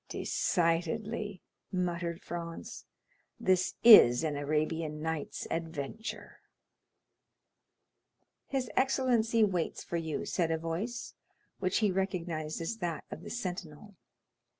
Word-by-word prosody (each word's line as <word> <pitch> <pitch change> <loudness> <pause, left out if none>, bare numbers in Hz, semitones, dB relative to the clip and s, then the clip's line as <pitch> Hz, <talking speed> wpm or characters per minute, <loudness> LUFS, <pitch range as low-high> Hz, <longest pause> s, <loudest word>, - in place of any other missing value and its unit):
"Decidedly," 185 +4 -1 0.3
muttered 175 -2 -2
Franz, 170 -1 -6 0.5
"this 185 -1 +2
is 160 - +9
an 155 -2 -1
Arabian 150 +2 -1
Nights' 160 -1 -3
adventure." 165 +5 -5 2.1
"His 260 -5 -2
excellency 245 -4 +3
waits 180 -5 0
for 170 - -3
you," 160 -2 -3
said 170 -3 0
a 165 - +1
voice, 175 +10 -4 0.5
which 185 -1 +1
he 200 - +3
recognized 175 -5 -2
as 195 +8 -3
that 175 -6 -3
of - - -7
the - - -8
sentinel. 185 -3 -6
175 Hz, 105 wpm, -31 LUFS, 160-210 Hz, 2.1 s, is